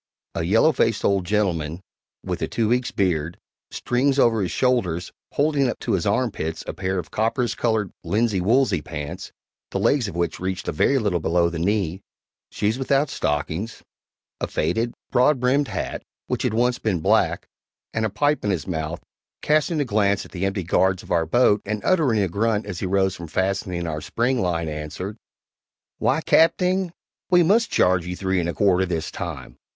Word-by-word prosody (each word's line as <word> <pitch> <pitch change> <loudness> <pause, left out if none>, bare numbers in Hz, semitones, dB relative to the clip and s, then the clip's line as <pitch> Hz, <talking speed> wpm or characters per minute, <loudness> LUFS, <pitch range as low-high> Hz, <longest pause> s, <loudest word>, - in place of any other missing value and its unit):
A - - -2
yellow 110 - +4
faced 115 -6 +1
old 100 -2 +2
gentleman, 85 -6 0 0.4
with - - -4
a - - 0
two 110 -2 0
weeks' 125 +1 +1
beard, 85 -4 -1 0.3
strings 135 +3 0
over 115 -5 +4
his 90 - -1
shoulders 95 -10 0 0.2
holding 145 -2 +2
up - - -3
to 120 - -2
his 95 -3 0
armpits 100 -8 -1
a - - -4
pair 95 0 -2
of 85 -3 -5
copperas 115 +2 0
colored 110 -4 0
linsey 105 -3 +1
woolsey 110 - +2
pants, 75 -1 -6 0.4
the - - -3
legs 135 -6 +2
of 95 - -7
which 85 -1 -1
reached 95 0 -3
a - - +1
very 110 - +2
little 100 -8 0
below 85 +1 +2
the 85 - -4
knee; 95 -1 0 0.5
shoes 110 +4 -1
without 135 +2 +1
stockings; 80 +9 -2 0.6
a - - -2
faded, 115 +10 0 0.2
broad 130 +3 +4
brimmed 135 +3 +2
hat, - - -4 0.2
which - - -2
had 110 - 0
once 125 +1 +2
been 95 -6 0
black, - - +2 0.5
and 110 - -1
a 110 - +1
pipe 145 +7 +1
in 105 - 0
his 90 -5 -1
mouth 80 -2 -4 0.4
casting 155 +1 +2
a 145 - +1
glance 100 -3 +1
at - - -15
the 95 0 -2
empty 95 -1 -2
guards 95 +2 +1
of - - -12
our 85 -2 +2
boat 105 +1 +3
and 105 +1 -4
uttering 145 - +3
a - - +1
grunt 105 +4 0
as 100 -4 -5
he 95 - -2
rose 95 0 +1
from 85 - -8
fastening 95 -1 -1
our 75 -2 -3
"spring 120 +6 0
line," 85 -2 -1
answered: 75 +6 -5 0.8
"Why, - - +2
Capting, 180 +2 +3 0.4
we 180 -1 +5
must 220 +7 +3
charge 90 -1 +2
you 90 - -3
three 95 0 0
and 85 -1 -1
a - - -2
quarter 95 -2 +3
THIS 85 -3 -3
time." - - -6
100 Hz, 185 wpm, -23 LUFS, 90-120 Hz, 0.8 s, we